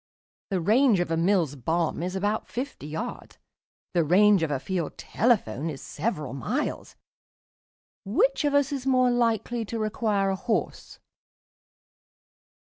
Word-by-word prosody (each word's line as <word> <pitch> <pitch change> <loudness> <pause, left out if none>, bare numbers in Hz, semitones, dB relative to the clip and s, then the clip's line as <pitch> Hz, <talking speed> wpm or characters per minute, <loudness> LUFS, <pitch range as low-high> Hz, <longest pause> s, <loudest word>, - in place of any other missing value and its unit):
The 190 -3 0
range 225 +3 +4
of 175 -2 -1
a - - +2
Mills 165 -4 +1
bomb 160 +6 -1
is 180 +2 -3
about 205 +3 -1
fifty 250 - -5
yards; 210 +11 -6 0.6
the 170 -2 +3
range 195 +4 +5
of 160 - 0
a 140 -3 -1
field 175 0 -3
telephone 165 - 0
is 140 -3 -6
several 150 - -4
miles. 240 - -3 1.1
Which 400 - +1
of 290 -1 +1
us 285 -1 +3
is 270 -2 -4
more 255 -1 +4
likely 235 -1 0
to 230 - -5
require 215 -3 0
a - - 0
horse?" 220 +4 -3
205 Hz, 135 wpm, -26 LUFS, 165-240 Hz, 1.1 s, range